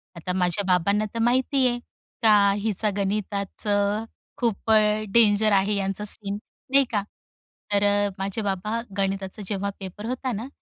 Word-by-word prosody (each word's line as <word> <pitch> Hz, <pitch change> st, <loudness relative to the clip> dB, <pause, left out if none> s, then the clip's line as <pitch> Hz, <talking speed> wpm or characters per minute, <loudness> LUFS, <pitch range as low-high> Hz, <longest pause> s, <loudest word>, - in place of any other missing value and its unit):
आता 180 Hz, +2 st, -4 dB
माझ्या 180 Hz, +2 st, 0 dB
बाबांना 200 Hz, +4 st, +2 dB
तर 230 Hz, -, -3 dB
माहिती 255 Hz, +3 st, +2 dB
आहे, 240 Hz, 0 st, -1 dB, 0.4 s
का 205 Hz, -3 st, +5 dB
हिचा 215 Hz, 0 st, 0 dB
गणिताचं 205 Hz, +1 st, -1 dB, 0.3 s
खूप 225 Hz, -2 st, -1 dB, 0.4 s
डेंजर 215 Hz, -2 st, +4 dB
आहे 200 Hz, +1 st, +3 dB
यांचा 195 Hz, +1 st, -2 dB
सीन 205 Hz, -1 st, +1 dB, 0.3 s
नाही 275 Hz, 0 st, +6 dB
का. 205 Hz, -2 st, +1 dB, 0.7 s
तर 200 Hz, 0 st, +3 dB, 0.4 s
माझे 195 Hz, +3 st, -2 dB
बाबा 205 Hz, +3 st, -2 dB, 0.2 s
गणिताचा 195 Hz, +1 st, -2 dB
जेव्हा 200 Hz, -1 st, -2 dB
पेपर 195 Hz, +3 st, -8 dB
होता 255 Hz, +1 st, -2 dB
ना 225 Hz, +4 st, -4 dB
205 Hz, 135 wpm, -25 LUFS, 195-220 Hz, 0.7 s, नाही